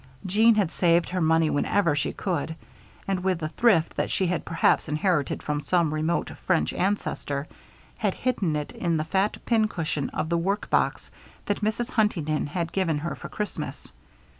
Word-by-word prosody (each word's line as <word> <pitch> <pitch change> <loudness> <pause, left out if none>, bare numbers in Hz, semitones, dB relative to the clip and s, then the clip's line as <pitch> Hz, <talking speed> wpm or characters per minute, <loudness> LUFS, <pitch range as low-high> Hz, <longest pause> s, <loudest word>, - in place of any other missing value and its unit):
Jeanne 220 +4 +5
had 195 -6 +1
saved 170 -1 +2
her 185 0 -1
money 160 0 +3
whenever 155 +2 +2
she 145 - -1
could, 170 -4 -2 0.5
and, 190 -2 -1
with 185 -2 +1
the 155 -2 -3
thrift 180 -4 +3
that - - 0
she 190 - 0
had 180 -1 -1
perhaps 165 -1 +2
inherited 150 -1 0
from 150 -1 -1
some 170 -2 +1
remote 155 +2 0 0.2
French 75 - +2
ancestor, 160 -7 -1 0.5
had - - 0
hidden 200 -11 0
it 150 -1 -3
in 170 -2 -1
the 155 - 0
fat 190 +6 0
pincushion 200 - 0
of 160 - -3
the 170 0 +1
work 195 +5 -1
box - - +1 0.3
that 205 - -1
Mrs. 220 +3 -1
Huntington 165 -10 +1
had 170 +2 -3
given 175 -6 0
her 150 0 -3
for - - -9
Christmas. 210 -1 -5
170 Hz, 170 wpm, -26 LUFS, 155-195 Hz, 0.5 s, Jeanne